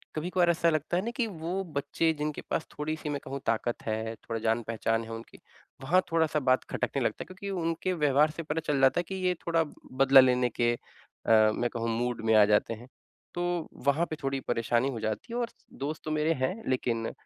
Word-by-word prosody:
कभी-कभार 175 +2 +1
ऐसा 170 0 +3
लगता 155 +2 0
है 185 - 0
ना 235 - -2
कि 245 - +2
वो 180 0 -3
बच्चे 160 +3 +1
जिनके 150 0 -2
पास 160 - -1
थोड़ी-सी 155 0 -4
मैं 145 - -2
कहूँ 135 +1 -5
ताकत 115 +1 -1
है, 110 +1 -2
थोड़ा 115 0 -5
जान 115 +1 +1
पहचान 115 0 -1
है 115 - -9
उनकी, 115 0 -10 0.4
वहाँ 175 +7 +3
थोड़ा-सा 160 -2 +2
बात 130 -2 +2
खटकने - - -1
लगता - - -1
है। - - -17
क्योंकि 185 +2 -8
उनके 165 +3 -1
व्यवहार 150 -1 +3
से 165 +2 -6
पता 155 +1 -2
चल 140 -2 +1
जाता 135 +6 +5
है - - 0
कि 190 - -3
ये 185 -1 +1
थोड़ा 165 -1 +3 0.3
बदला 135 +1 +7
लेने 125 -1 +3
के 120 0 +3
अ, 110 -2 +1
मैं 120 - 0
कहूँ 115 0 -2
मूड 120 0 -1
में 110 - +4
आ 105 - +8
जाते 105 +2 +2
हैं। 120 +3 -10 0.5
तो 175 -1 -1 0.2
वहाँ 155 +5 +3
पे 155 - -3
थोड़ी 135 0 0
परेशानी 120 +3 +1
हो 115 - -5
जाती 110 - -3
है। 240 - -1
और 235 -1 -1 0.4
दोस्त 155 +2 -4
तो 155 - -2
मेरे 155 +1 +2
हैं 180 - +1 0.2
लेकिन 115 -3 0
140 Hz, 215 wpm, -29 LUFS, 115-165 Hz, 0.5 s, आ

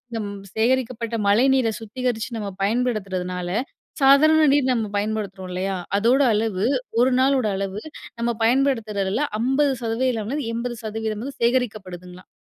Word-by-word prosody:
நம் 210 -2 -3 0.3
சேகரிக்கப்பட்ட 235 0 0
மழைநீரை 245 +2 +3
சுத்திகரிச்சு 235 +1 -3
நம்ம 210 - -4 0.2
பயன்படுத்துறதுனால, 195 -6 -1 0.5
சாதாரண 310 +4 +6
நீர் 265 -3 +2
நம்ம 225 -3 -1
பயன்படுத்துறோம் 200 -3 -3
இல்லயா! 190 +1 -2 0.2
அதோட 240 +7 +3
அளவு 210 -2 0 0.4
ஒரு 255 +1 +4
நாளோட 260 -3 +3
அளவு, 195 +2 -4 0.4
நம்ம 235 0 0
பயன்படுத்துறதில 225 -4 +1 0.2
50% 250 -3 0
லேருந்து 280 -5 -2
80% 225 -2 -4
வந்து 275 +1 -7
சேகரிக்கப்படுதுங்கலாம். 190 -7 -2
225 Hz, 110 wpm, -23 LUFS, 205-255 Hz, 0.5 s, சாதாரண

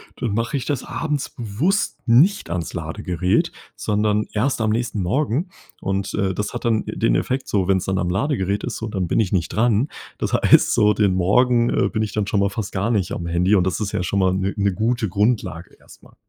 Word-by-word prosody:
dann 120 -5 -3
mache 115 +7 -1
ich 135 - -2
das 145 -3 -2
abends 150 -3 -3
bewusst 125 - -1
nicht 145 - +4
ans 85 -1 -3
Ladegerät, 90 +2 -1 0.2
sondern 105 0 0
erst 120 +3 0
am 110 - +1
nächsten 110 -1 -1
Morgen. 135 - 0 0.3
Und, 95 0 -2
äh, 95 -2 0
das 105 +3 -3
hat - - -5
dann 115 -2 +1
den - - 0
Effekt 130 - -1
so, 95 -3 +1
wenn's 95 -2 +2
dann 95 0 -1
am 90 - -1
Ladegerät 100 -2 -1
ist 125 - -4
so 115 - -4
dann 95 -5 -2
bin - - +1
ich 105 -4 0
nicht 85 -3 0
dran. 115 +3 +1 0.3
Das - - -2
heißt - - +5
so, 105 0 +4
den 105 -2 +2
Morgen, 120 +6 +3
äh, - - +1
bin 110 - -2
ich 110 - -2
dann 105 -2 -1
schon 105 - +1
mal 100 0 +2
fast 100 0 -5
gar 100 +4 -1
nicht 100 -6 0
am 85 - -4
Handy 90 +4 +2
und 95 -2 +2
das 95 - -2
ist 105 -2 -2
ja 90 - -1
schon 100 +2 -1
mal 95 -1 +3
'ne 95 +1 -1
'ne 100 -1 +1
gute 115 +1 0
Grundlage 100 -4 -1
erst - - -18
mal. - - -20
105 Hz, 225 wpm, -21 LUFS, 95-120 Hz, 0.3 s, heißt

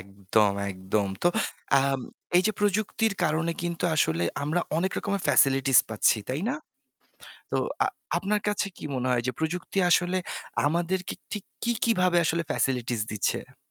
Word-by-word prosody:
একদম, 100 +2 +1 0.2
একদম। 95 +2 -1
তো 175 - +5 0.5
আম 135 -1 0 0.4
এইযে 200 +4 +4
প্রযুক্তির 210 +1 +1
কারণে 160 +2 +1
কিন্তু 170 0 -2
আসলে 85 - +2 0.2
আমরা 160 +5 0 0.2
অনেক 190 +3 0
রকমের 200 -2 -2
ফ্যাসিলিটিস 135 -1 +5
পাচ্ছি, 110 0 +3
তাই 135 +5 -2
না? 275 - 0 1.0
তো - - 0 0.3
আ - - +2 0.3
আপনার 210 +1 0
কাছে 205 0 0
কি - - -10
মনে 130 0 -1
হয় 120 -1 +2
যে 130 - 0
প্রযুক্তি 175 +4 -2
আসলে 180 +2 +3 0.5
আমাদেরকে 175 +4 -1 0.2
ঠিক 210 -3 -4 0.2
কী, 235 - +1
কী 230 - +4
ভাবে 180 -1 +3
আসলে 170 +1 +1
ফ্যাসিলিটিস 125 -3 0
দিচ্ছে? 105 - -2
160 Hz, 150 wpm, -27 LUFS, 125-185 Hz, 1.0 s, তো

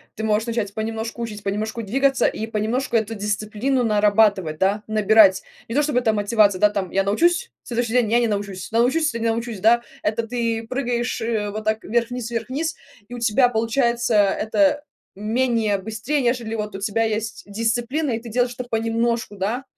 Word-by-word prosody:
Ты 220 - -4
можешь 215 +1 +1
начать 225 -4 -2
понемножку 225 +2 -4
учить, 210 -3 -6
понемножку 215 +3 -3
двигаться 270 +6 +1
и 220 - -3
понемножку 225 +3 -1
эту 220 0 -2
дисциплину 215 +5 -1
нарабатывать, 205 -6 +3
да, 200 +2 +1
набирать. 215 -2 +5 0.3
Не 230 - -4
то 295 - +4
чтобы 285 -4 +1
эта 230 -3 +2
мотивация, 205 -2 +2
да, 210 - +5
там, 200 -3 -3
я 195 0 +2
научусь, 345 - +1
следующий 235 -1 -2
день- 240 -4 +2
я 235 - +4
не 235 - +2
научусь, 200 -3 -4
научусь 260 +7 +2
или 230 - -3
не 230 - +1
научусь, 225 -3 -3
да. 235 +2 +5 0.2
Это 225 +2 -1
ты 230 -1 -2
прыгаешь, 245 -2 -2
э, 220 -2 -1
вот 215 +1 -5
так 220 +1 -1
вверх-вниз, 235 +1 -1
вверх-вниз, 260 +8 -2 0.3
и 245 - -10
у 245 - -6
тебя 235 +2 +3
получается 235 0 0
это 225 +9 +2 0.3
менее 220 0 0
быстрее, 220 +9 -2
нежели, 240 -2 -1
вот, 210 -2 -4
у 195 - -6
тебя 220 +2 0
есть 220 +1 -3
дисциплина, 235 +8 -1
и 225 - -1
ты 235 - -11
делаешь 245 +2 0
это 250 - -4
понемножку, 230 -1 -1
да, 220 +7 -2
225 Hz, 180 wpm, -22 LUFS, 210-240 Hz, 0.3 s, набирать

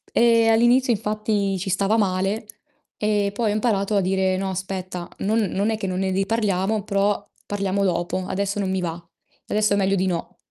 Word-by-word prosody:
Ehm, 230 -1 +5
all'inizio 240 +2 +4
infatti 210 -2 -1
ci 190 +1 -3
stava 200 +4 +2
male 195 +1 0 0.5
e 205 -1 +1
poi 220 0 0
ho - - +1
imparato 210 -2 +1
a 200 - +4
dire: 190 0 +1
"No 190 0 -2
aspetta, 185 -1 -5 0.2
non 220 +3 +2
non 205 0 0
è 220 - -1
che 195 - -3
non 185 -1 -2
ne 190 0 0
riparliamo, 200 0 0
però 200 0 +1 0.3
parliamo 200 -1 -1
dopo. 175 0 -1
Adesso 200 +1 -2
non 195 -2 -1
mi 190 0 0
va. 170 -2 -2 0.5
Adesso 210 -1 +2
è - - +3
meglio 195 0 +2
di 190 0 +1
no." 175 -2 -3
200 Hz, 190 wpm, -23 LUFS, 190-215 Hz, 0.5 s, Ehm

